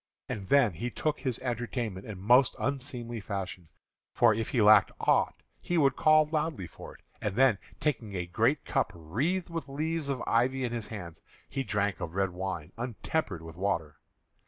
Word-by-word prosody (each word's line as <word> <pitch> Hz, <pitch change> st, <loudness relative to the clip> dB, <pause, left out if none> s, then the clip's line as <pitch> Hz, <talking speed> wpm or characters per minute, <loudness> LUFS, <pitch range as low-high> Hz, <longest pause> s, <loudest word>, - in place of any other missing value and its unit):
And 100 Hz, -3 st, -5 dB
then 130 Hz, -4 st, +4 dB
he 120 Hz, +10 st, -3 dB
took 150 Hz, +5 st, -1 dB
his 130 Hz, -3 st, -2 dB
entertainment 120 Hz, -5 st, -3 dB
in 100 Hz, -4 st, -7 dB
most 120 Hz, +6 st, +5 dB
unseemly 125 Hz, -2 st, -3 dB
fashion; 95 Hz, -4 st, -5 dB, 0.4 s
for -, -, +5 dB
if 110 Hz, +1 st, -2 dB
he 125 Hz, -, 0 dB
lacked 105 Hz, -1 st, +7 dB
aught -, -, +2 dB, 0.2 s
he 175 Hz, -, -1 dB
would 135 Hz, -4 st, +4 dB
call 155 Hz, 0 st, +5 dB
loudly 150 Hz, -, -2 dB
for 80 Hz, -, -11 dB
it; -, -, -19 dB, 0.2 s
and 105 Hz, -2 st, -2 dB
then, 125 Hz, -5 st, +4 dB, 0.2 s
taking 115 Hz, -9 st, -1 dB
a 90 Hz, -1 st, -2 dB
great 115 Hz, +11 st, +1 dB
cup -, -, 0 dB
wreathed 140 Hz, -, -1 dB
with 165 Hz, -3 st, -4 dB
leaves 155 Hz, +1 st, -2 dB
of 135 Hz, -2 st, -2 dB
ivy 130 Hz, +3 st, +2 dB
in 120 Hz, -, -1 dB
his 115 Hz, -3 st, -3 dB
hands, 90 Hz, -7 st, -8 dB, 0.3 s
he 135 Hz, -, -3 dB
drank 105 Hz, -4 st, -1 dB
of 85 Hz, +1 st, -5 dB
red 95 Hz, -1 st, +1 dB
wine 90 Hz, -3 st, -4 dB
untempered 120 Hz, -, -2 dB
with 80 Hz, 0 st, -9 dB
water. 85 Hz, -5 st, -2 dB
115 Hz, 180 wpm, -30 LUFS, 95-135 Hz, 0.4 s, lacked